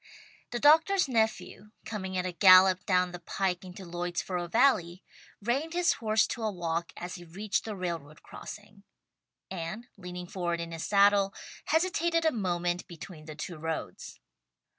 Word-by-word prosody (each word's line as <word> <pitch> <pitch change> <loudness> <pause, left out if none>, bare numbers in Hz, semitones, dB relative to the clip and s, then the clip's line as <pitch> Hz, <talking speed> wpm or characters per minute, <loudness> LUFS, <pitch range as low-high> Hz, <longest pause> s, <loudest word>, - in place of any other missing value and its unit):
The 240 - -3
doctor's 320 +6 +5
nephew 220 -3 -1 0.2
coming 190 -4 -4
at 180 - -1
a 185 - -2
gallop 185 0 +6
down 180 -1 +2
the 180 - -7
pike 180 +1 -2
into 185 +1 -10
Lloydsboro 175 +1 -3
Valley, 190 -6 +2 0.4
reined 275 +9 -1
his 350 0 +3
horse 220 -1 +2
to 235 - -4
a 220 -1 0
walk 170 -2 -3
as 175 +1 -6
he - - -10
reached 195 +4 -3
the 215 -2 -4
railroad 170 -5 -5
crossing, 210 -1 -11 0.7
and 190 +7 -5
leaning 180 -1 -7
forward 175 -2 -2
in 170 0 -5
his 165 -1 -5
saddle, 200 -1 +4 0.3
hesitated 335 0 +1
a 320 - +4
moment 175 - -1
between 165 -2 -10
the 155 -1 -8
two 165 +3 -6
roads. 160 0 -5
185 Hz, 155 wpm, -29 LUFS, 175-220 Hz, 0.7 s, gallop